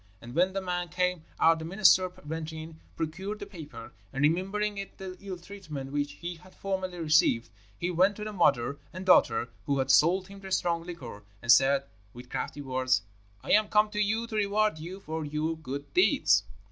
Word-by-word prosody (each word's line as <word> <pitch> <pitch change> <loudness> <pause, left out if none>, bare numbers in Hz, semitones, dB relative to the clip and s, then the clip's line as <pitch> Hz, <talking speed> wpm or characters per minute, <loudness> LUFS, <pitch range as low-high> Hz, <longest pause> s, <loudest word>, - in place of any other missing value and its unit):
And 120 +3 -10
when 185 +4 +2
the 195 - -2
man 180 -1 -2
came 180 -1 -1
out 165 0 +5
the 160 - -6
minister 185 0 +5 0.2
went 160 +1 -4
in, 160 0 -9 0.2
procured 190 +6 -4
the - - -7
paper, 155 - -10 0.2
and 135 +2 -2
remembering 195 +7 +1 0.2
the 190 -1 -7
ill 195 -2 -6
treatment 170 -8 -8
which 145 0 -1
he 175 0 -6
had 185 +3 -18
formerly 190 -2 -3
received, 150 -8 +3 0.3
he 175 +1 -2
went 185 +4 +3
to 210 - -6
the 215 0 -5
mother 140 -6 +2
and 185 +1 -7
daughter 120 -9 +4 0.2
who 140 -1 +1
had 135 0 +2
sold 180 +7 +4
him 200 0 -11
the 190 -1 -9
strong 170 -2 +1
liquor, 140 -12 -8 0.2
and 120 - +5
said, 135 +2 +5 0.3
with 125 +1 -12
crafty 145 - -4
words, 130 -4 +1 0.4
'I - - -3
am 215 0 +5
come 210 0 +3
to 210 - -3
you 220 +3 +1
to 230 -2 -7
reward 210 -3 +1
you 180 +5 -7
for 160 -2 -4
your 155 +2 -2
good 140 -2 -7
deeds.' 365 - +4
170 Hz, 195 wpm, -29 LUFS, 145-190 Hz, 0.4 s, out